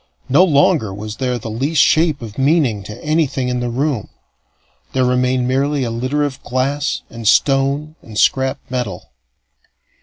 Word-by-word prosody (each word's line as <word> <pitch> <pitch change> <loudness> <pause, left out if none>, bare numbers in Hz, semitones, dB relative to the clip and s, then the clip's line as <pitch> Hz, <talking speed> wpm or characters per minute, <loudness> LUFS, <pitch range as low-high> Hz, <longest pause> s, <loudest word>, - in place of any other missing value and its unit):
No 145 +8 +6
longer 150 - +3
was 105 +2 -7
there 125 -2 -1
the 110 -1 -6
least 140 +8 -1
shape 155 -2 +3
of 110 +1 -8
meaning 135 -7 +2
to 105 +4 -9
anything 150 -5 0
in 125 0 -1
the 120 0 -2
room; 130 -2 -2 0.8
there 130 -1 +2
remained 125 0 +1
merely 135 +2 0
a 120 - -2
litter 130 +6 -1
of 140 -3 -4
glass 135 +4 -1
and 115 -2 -5
stone 140 +6 +2
and 110 -2 -10
scrap 130 +4 +2
metal. 120 -9 -4
130 Hz, 155 wpm, -18 LUFS, 120-145 Hz, 0.8 s, No